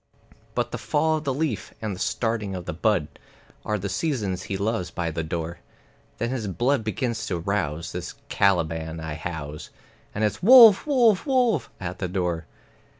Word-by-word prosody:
But - - -1
the - - -4
fall 155 +1 +1
of 155 - -7
the 135 - +1
leaf 140 -5 -2
and 105 -3 -3
the - - -11
starting 110 -4 -1
of 90 -1 -6
the - - -4
bud 90 -2 +1 0.6
Are 105 - -1
the 100 0 -4
seasons 105 - -1
he 95 - -1
loves 100 -3 -1
by 85 -1 -3
the 80 - -2
door; 80 +1 -4 0.6
Then 115 +2 -2
his 120 -5 -3
blood 120 +6 +1
begins 115 +1 -2
to 90 - -1
rouse, 85 -4 -2
this - - -6
Caliban 80 -4 +1
I 80 -1 -5
house, 75 -2 -6 0.5
And 105 - -1
it's 105 0 0
"Wolf, 230 - +9
wolf, 245 -5 +3
wolf!" 245 - +2
at 90 0 -5
the 95 - -1
door. 90 -3 -2
100 Hz, 175 wpm, -25 LUFS, 85-130 Hz, 0.6 s, Wolf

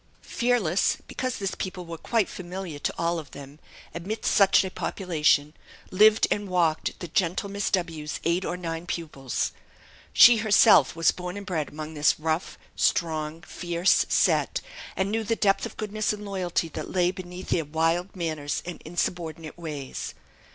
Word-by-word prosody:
Fearless 235 -8 +1
because 255 -2 -3
this 195 -2 -2
people 185 -1 -5
were 165 0 -6
quite 225 -5 +1
familiar 180 -4 -7
to - - -2
all 170 0 0
of 155 - -10
them 140 +1 -11 0.3
amidst 195 +6 -2
such 195 -1 +5
a 190 - -5
population, 150 -7 +1 0.4
lived 215 +3 +6
and 205 -1 -1
walked 170 -3 0
the 175 - -4
gentle 180 +4 0
Miss 200 0 -1
W 165 -5 -1
's - - -3
eight 170 +3 +1
or 180 - -3
nine 165 -1 -5
pupils. 145 -8 -3 0.6
She 240 -1 +8
herself 210 - +5
was 165 0 +4
born 180 +1 -6
and 200 - -7
bred 160 -6 -2
among 155 +1 -7
this 150 -1 +2
rough, 160 +2 -2 0.2
strong, 160 -1 0
fierce 175 -1 +1
set, - - +2 0.4
and 190 +1 -1
knew 225 +1 0
the 225 +2 0
depth 195 -3 +2
of - - -15
goodness 215 0 -1
and 210 0 -6
loyalty 185 -4 -1
that - - -6
lay 180 -1 +2
beneath 185 0 -9
their 165 - +1
wild 165 +5 0
manners 155 -5 -3
and 175 -1 -7
insubordinate 165 -1 -3
ways. 150 -5 -6
175 Hz, 165 wpm, -26 LUFS, 160-195 Hz, 0.6 s, She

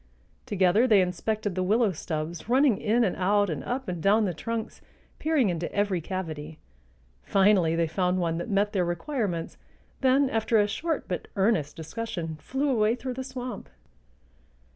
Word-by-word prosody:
Together 200 +5 +3
they 215 -5 +6
inspected 205 +3 -1
the 185 - -2
willow 210 +3 +2
stubs, 160 +2 -5
running 260 -4 +4
in 230 +3 +2
and 195 - 0
out 200 0 +2
and 150 - -4
up 260 +2 -3
and 175 -2 -4
down 210 +4 +4
the 180 - -1
trunks, 225 +6 -5 0.4
peering 310 -7 +2
into 170 -1 -3
every 200 -4 0
cavity. 160 -4 -5 0.6
Finally 190 - +3
they 165 0 +2
found 180 +3 0
one 165 -2 -1
that 175 - -5
met 205 +1 +1
their 190 -3 +2
requirements, 175 - -3 0.4
then, 270 +1 +4
after 225 -1 +1
a 205 - +4
short 310 +9 -2
but 180 - -4
earnest 190 -8 +1
discussion, 165 -1 -5
flew 270 - -1
away 220 -2 +2
through 250 +1 -5
the 260 +1 -5
swamp. 255 -1 -7
200 Hz, 165 wpm, -27 LUFS, 175-230 Hz, 0.6 s, they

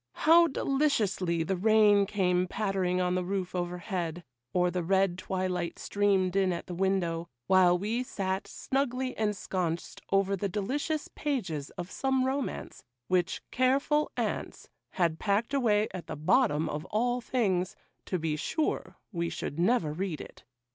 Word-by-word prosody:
How 335 +2 +6
deliciously 220 - +1
the 190 +4 -1
rain 205 0 +5
came 185 -3 +1
pattering 190 -3 0
on 180 0 +1
the 185 0 0
roof 185 0 -3
over 180 0 -2
head, 175 -2 -4 0.3
or 180 -1 +2
the 180 0 -1
red 190 +1 +2
twilight 185 -1 -2
streamed 195 -2 +1
in 190 -2 +3
at 170 - -4
the 180 - -6
window, 175 -2 0 0.2
while 180 0 +5
we 215 +6 -1
sat 190 -5 -3
snugly 260 -1 -2
ensconced 185 -5 -2
over 195 0 +3
the 195 +1 -2
delicious 285 - -2
pages 185 - -3
of 175 +1 -5
some 265 -1 +1
romance, 270 +1 -3 0.3
which 185 0 +1
careful 275 +4 +2
aunts - - -3 0.2
had 170 -3 +1
packed 215 +6 0
away 215 -6 +3
at 185 - -7
the - - -4
bottom 160 - +2
of 150 +1 -3
all 245 +5 0
things, 195 -7 0 0.3
to 185 - 0
be 160 -2 -1
sure 300 - -2
we 170 -3 -1
should 145 - -5
never 175 -5 +2
read 175 -1 -3
it! - - -11
190 Hz, 150 wpm, -29 LUFS, 175-230 Hz, 0.3 s, How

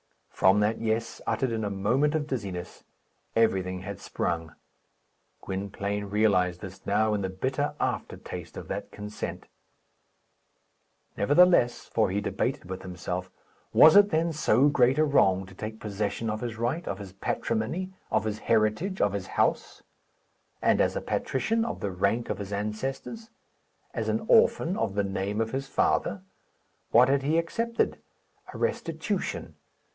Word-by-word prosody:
From 95 +2 +4
that 105 +2 +1
"Yes," 115 0 -2
uttered 115 +3 0
in 110 -1 -2
a 105 - -1
moment 125 +10 +1
of 155 -2 0
dizziness, 100 - -5 0.5
everything 95 -5 +1
had 100 0 -6
sprung. 85 -1 -3 0.9
Gwynplaine 100 +1 -3
realized 95 -4 +2
this 95 -2 -9
now 110 +1 +2
in 105 - 0
the 95 - -2
bitter 130 +10 -2
aftertaste - - -4
of - - -7
that - - -4
consent. 105 0 -6 1.7
Nevertheless 145 - +4
for 110 -4 +1
he 100 +2 0
debated 105 - -2
with 95 0 -5
himself 90 0 -5 0.4
was 160 - +8
it 205 0 +8
then 165 0 +1
so 140 -3 +3
great 130 -2 +3
a 155 - +4
wrong 95 -10 +3
to 95 - -14
take 110 +3 -6
possession 105 +2 -3
of 110 - -4
his 120 -2 -4
right, 120 +9 -2
of 100 - -2
his 95 -2 -9
patrimony, 145 - -2 0.2
of 110 -1 +1
his 110 -1 -3
heritage, 115 - +1
of 100 - +2
his 100 -2 -4
house; - - 0 0.8
and, - - +3
as - - +1
a - - -2
patrician, 225 - 0
of 230 - -4
the 100 - -2
rank 100 +6 0
of - - -4
his 100 -1 -6
ancestors; 130 - -4 0.6
as - - -2
an - - -1
orphan, 455 - +4
of 105 - -1
the 100 - +2
name 100 +2 -2
of 110 0 0
his 135 +1 -3
father? 100 -7 0 0.7
What 125 +2 +6
had 140 0 +3
he 150 +4 +1
accepted? 230 +8 -1 0.5
A - - -8
restitution. - - -2
110 Hz, 150 wpm, -27 LUFS, 100-135 Hz, 1.7 s, was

